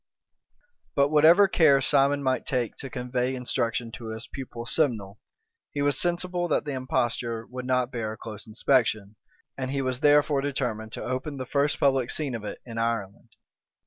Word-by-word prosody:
But 140 Hz, 0 st, +3 dB
whatever 160 Hz, +6 st, +6 dB
care 155 Hz, -7 st, +5 dB
Simon 140 Hz, +1 st, +2 dB
might 130 Hz, -2 st, 0 dB
take 125 Hz, -4 st, -1 dB
to 135 Hz, -, -6 dB
convey 125 Hz, +1 st, -2 dB
instruction 120 Hz, -2 st, -2 dB
to 115 Hz, 0 st, -8 dB
his 110 Hz, 0 st, -5 dB
pupil 120 Hz, -3 st, -8 dB
Simnel, 110 Hz, -9 st, -1 dB, 0.5 s
he 145 Hz, -, -1 dB
was 145 Hz, -1 st, +2 dB
sensible 175 Hz, 0 st, 0 dB
that -, -, 0 dB
the 145 Hz, -, -3 dB
imposture 120 Hz, -3 st, -1 dB
would 125 Hz, +1 st, -7 dB
not 125 Hz, -1 st, +1 dB
bear 110 Hz, -3 st, -3 dB
a -, -, -11 dB
close 110 Hz, -2 st, -9 dB
inspection; 110 Hz, -2 st, +1 dB, 0.4 s
and 130 Hz, -1 st, -2 dB
he 135 Hz, 0 st, -1 dB
was 130 Hz, -1 st, -2 dB
therefore 145 Hz, -1 st, +4 dB
determined 120 Hz, -6 st, -3 dB
to -, -, -5 dB
open 135 Hz, +3 st, -3 dB
the 130 Hz, -, -4 dB
first 140 Hz, +3 st, +1 dB
public 135 Hz, -3 st, +2 dB
scene 145 Hz, -5 st, -1 dB
of 115 Hz, -3 st, -5 dB
it 105 Hz, -, -6 dB
in 115 Hz, -2 st, -6 dB
Ireland. 115 Hz, -4 st, -3 dB
130 Hz, 175 wpm, -26 LUFS, 115-140 Hz, 0.5 s, whatever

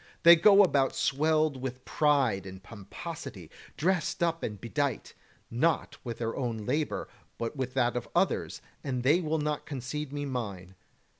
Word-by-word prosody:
They 170 Hz, +1 st, +10 dB
go 200 Hz, +4 st, +7 dB
about 140 Hz, -7 st, +2 dB
swelled 155 Hz, 0 st, +1 dB
with 130 Hz, -1 st, -5 dB
pride 135 Hz, -, +2 dB
and 95 Hz, 0 st, -10 dB
pomposity, 100 Hz, -, -8 dB, 0.3 s
dressed 175 Hz, +1 st, 0 dB
up 165 Hz, -1 st, 0 dB
and 105 Hz, -2 st, -4 dB
bedight, 140 Hz, +6 st, -2 dB, 0.4 s
not 160 Hz, +8 st, 0 dB
with 120 Hz, -2 st, -5 dB
their 115 Hz, -1 st, -3 dB
own 120 Hz, -4 st, -2 dB
labour, 145 Hz, +5 st, -1 dB, 0.3 s
but 115 Hz, +4 st, -3 dB
with 130 Hz, -1 st, -4 dB
that 120 Hz, -2 st, +2 dB
of 125 Hz, -, -4 dB
others; -, -, 0 dB, 0.2 s
and 130 Hz, -3 st, -2 dB
they 150 Hz, +7 st, +4 dB
will 160 Hz, -1 st, 0 dB
not 150 Hz, -1 st, -2 dB
concede 140 Hz, +1 st, -5 dB
me 145 Hz, 0 st, -3 dB
mine. 100 Hz, -9 st, -5 dB
135 Hz, 155 wpm, -29 LUFS, 120-155 Hz, 0.4 s, They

